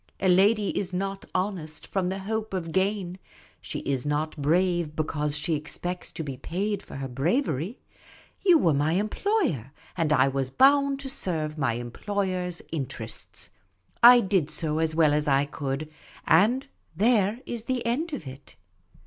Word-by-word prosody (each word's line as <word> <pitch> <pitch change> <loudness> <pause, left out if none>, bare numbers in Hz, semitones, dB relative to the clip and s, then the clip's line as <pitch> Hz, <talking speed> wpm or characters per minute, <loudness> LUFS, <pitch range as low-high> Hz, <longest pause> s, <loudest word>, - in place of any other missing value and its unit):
A 190 - +1
lady 200 +3 +4
is 185 -2 -2
not 195 +1 -3
honest 185 -5 -3
from 185 -2 -1
the 190 - -3
hope 215 +1 -3
of 165 -3 -3
gain; 190 0 -1 0.4
she - - -5
is 135 -3 -1
not 150 +1 -1
brave 170 +1 +1
because 150 -1 -1
she 155 +2 -1
expects 175 +4 -4
to 160 - -4
be 135 -3 -6
paid 200 +9 -2
for - - -11
her 135 0 -4
bravery. 160 - -1 0.7
You 360 -4 +7
were 165 - +3
my 145 +3 +1
employer, 215 - 0 0.2
and 160 -2 0
I 135 -3 +5
was 135 -1 -1
bound 275 - +4
to 275 - -6
serve 155 - -1
my 135 -5 +1
employer's 180 - -3
interests. 145 -6 -5 0.5
I 245 +1 +9
did 190 -7 +1
so 155 -1 -1
as 160 -1 0
well 155 -3 +4
as 150 +1 0
I 140 0 +3
could, 140 +1 -4 0.4
and 220 +11 +4 0.3
there 215 +1 +2
is 235 -2 -5
the 250 -1 -2
end 290 +9 -1
of 290 - -5
it. 130 +1 -11
180 Hz, 160 wpm, -26 LUFS, 150-205 Hz, 0.7 s, I